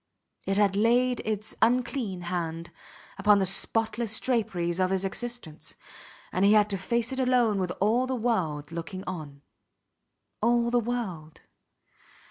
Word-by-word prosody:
It 195 0 +1
had 200 -2 +3
laid 245 +4 +2
its 215 0 -3
unclean 235 -5 +1
hand 170 -1 -4 0.5
upon 210 -1 +5
the 195 - +2
spotless 220 +3 +1
draperies 190 -8 -1
of 185 0 +2
his 190 0 0
existence, 235 -6 -6 0.6
and 185 - 0
he 200 +1 +6
had 210 -1 +4
to 195 - 0
face 235 +5 -1
it 265 - -3
alone 245 -5 +2
with 180 -1 -1
all 230 +6 +2
the 260 - -1
world 170 -12 -1
looking 170 +3 -6
on. 150 -6 -7 1.0
All 235 +1 +2
the 245 - +3
world! 200 -10 -4
210 Hz, 140 wpm, -27 LUFS, 180-235 Hz, 1.0 s, he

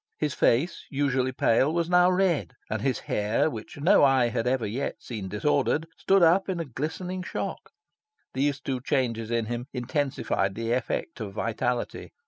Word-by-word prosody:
His 150 -3 -1
face, 140 +10 +1
usually 135 -2 0
pale, 130 +3 +2
was 170 0 0
now 180 0 +5
red; 180 -8 +1 0.2
and 110 -1 -1
his 130 -1 0
hair, 105 +9 0
which 110 +4 -8
no 155 +2 +5
eye 135 -3 +4
had 115 0 -1
ever 125 -2 +1
yet 120 +7 -3
seen 105 -6 -6
disordered, 140 +8 +1
stood 195 -1 +3
up 180 +4 +4
in 185 -2 -1
a 165 - -2
glistening 160 +8 -4
shock. 180 - -5 0.6
These 140 +1 0
two 130 -2 -3
changes 120 -5 -1
in 115 -1 0
him 120 +2 -4
intensified 130 -6 -1
the 115 0 -2
effect 125 +4 -2
of 105 -3 -5
vitality. 120 +3 -2
130 Hz, 165 wpm, -27 LUFS, 115-155 Hz, 0.6 s, now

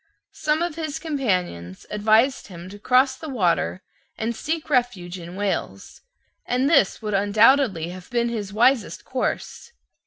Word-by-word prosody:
Some 305 +2 0
of 345 - -2
his 315 -2 -3
companions 185 - -2
advised 220 +5 +2
him 180 -1 -10
to 205 +1 -11
cross 260 +4 +3
the 315 +3 -8
water, 185 -5 0 0.3
and 230 +1 -2
seek 315 +6 -3
refuge 240 - -1
in 170 +1 -9
Wales; 200 0 -4 0.4
and 250 +2 0
this 235 - +3
would 210 -1 -3
undoubtedly 205 - +3
have 180 0 -10
been 235 -1 0
his 210 -4 -4
wisest 235 +2 +2
course. - - -4
220 Hz, 145 wpm, -23 LUFS, 190-270 Hz, 0.4 s, cross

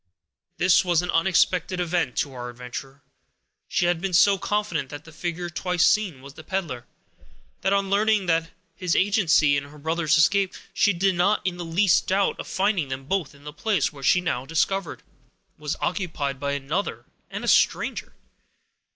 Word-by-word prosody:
This 180 +1 +4
was 175 -2 +2
an 180 - -2
unexpected 180 +1 +2
event 175 -7 -1
to 140 - -1
our 125 -1 -6
adventurer. 125 +3 -9 0.6
She - - 0
had 175 -1 +1
been 195 -1 -3
so 195 +2 +5
confident 205 -10 -2
that 145 +2 -8
the 165 - -14
figure 175 +2 -4
twice 180 +1 0
seen 185 -11 +1
was 140 -1 -11
the 160 - -12
peddler, 160 -9 -4 0.7
that 195 - +1
on 200 -1 +1
learning 210 -1 +2 0.5
his 180 -1 -1
agency 180 -7 +3
in 140 0 -2
her 145 +2 -14
brother's 160 +1 +1
escape, 195 +4 +3 0.2
she 205 - +3
did 190 +1 +1
not 185 +4 +1
in 180 -2 -1
the 175 - -5
least 175 +3 +2
doubt 195 +1 +1
of - - -6
finding 190 -5 0
them 135 0 -5
both 165 -3 -2
in 140 - -19
the 150 0 -8
place, 185 -1 0
which, 140 -2 -4
she 180 - +4
now 130 -8 -2
discovered, 165 +6 -1 0.6
was 150 -1 -3
occupied 160 -8 -2
by 140 0 -2
another 140 +8 -3 0.2
and - - -6
a - - -4
stranger. - - +1
175 Hz, 175 wpm, -24 LUFS, 145-190 Hz, 0.7 s, so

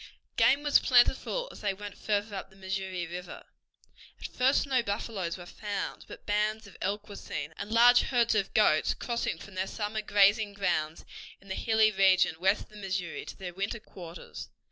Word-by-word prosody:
Game 280 +2 +4
was 290 -1 +5
plentiful 265 - +3
as - - -12
they 200 -2 -1
went 205 0 -8
farther 205 0 -2
up 195 - -6
the 190 - -21
Missouri 190 -1 -4
River. 175 +1 -8 0.8
At - - -8
first 265 +4 +2
no 265 -3 +2
buffaloes 200 -5 -3
were 175 - -10
found, 205 +2 -5
but - - -11
bands 215 +1 0
of 200 - -14
elk 205 +2 -2
were 205 - -9
seen, 155 -4 -6
and 205 +1 -5
large 240 +2 +7
herds 240 -3 +2
of 200 -3 0
goats 155 -8 +4
crossing 235 -8 -2
from 200 +4 -12
their 185 +1 -2
summer 215 +1 -3
grazing 205 0 +3
grounds 170 -5 -1 0.3
in 195 - -18
the - - -2
hilly 220 +1 +3
region 190 -4 +4
west 190 +3 +2
of - - -20
the 210 - -14
Missouri 190 -4 -4
to - - -9
their 180 -3 -7
winter 200 +5 -3
quarters. 175 -4 -10
200 Hz, 190 wpm, -29 LUFS, 190-220 Hz, 0.8 s, large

